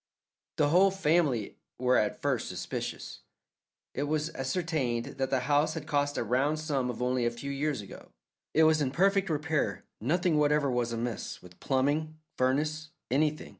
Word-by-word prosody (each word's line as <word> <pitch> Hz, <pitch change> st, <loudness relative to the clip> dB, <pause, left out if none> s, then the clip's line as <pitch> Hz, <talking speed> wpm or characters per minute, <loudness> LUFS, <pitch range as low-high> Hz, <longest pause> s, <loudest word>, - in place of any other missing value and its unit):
The 145 Hz, -, +3 dB
whole 185 Hz, +5 st, +6 dB
family 155 Hz, -, +1 dB, 0.2 s
were 125 Hz, 0 st, +2 dB
at 105 Hz, -, 0 dB
first -, -, 0 dB
suspicious. -, -, -5 dB, 0.7 s
It 140 Hz, -, -2 dB
was 155 Hz, +1 st, -1 dB
ascertained 135 Hz, -4 st, -2 dB
that 135 Hz, 0 st, 0 dB
the 130 Hz, -2 st, +1 dB
house 145 Hz, +4 st, +2 dB
had 160 Hz, -2 st, -5 dB
cost 145 Hz, -2 st, 0 dB
a -, -, 0 dB
round 130 Hz, +7 st, +1 dB
sum 145 Hz, -5 st, -1 dB
only 125 Hz, 0 st, +1 dB
a 120 Hz, -, +3 dB
few 120 Hz, +4 st, -6 dB
years 140 Hz, -3 st, -1 dB
ago; 100 Hz, -, -12 dB, 0.5 s
it 160 Hz, -, +6 dB
was 155 Hz, -1 st, +4 dB
in 135 Hz, -, +1 dB
perfect 195 Hz, +5 st, +2 dB
repair; 150 Hz, -, -1 dB
nothing 160 Hz, -, +1 dB
whatever 150 Hz, -2 st, +3 dB
was 120 Hz, -1 st, 0 dB
amiss 115 Hz, -1 st, -4 dB
with 90 Hz, 0 st, -15 dB
plumbing, 145 Hz, +4 st, 0 dB, 0.2 s
furnace, 155 Hz, +5 st, 0 dB, 0.2 s
anything. 150 Hz, +3 st, +1 dB
145 Hz, 160 wpm, -29 LUFS, 125-155 Hz, 0.7 s, whole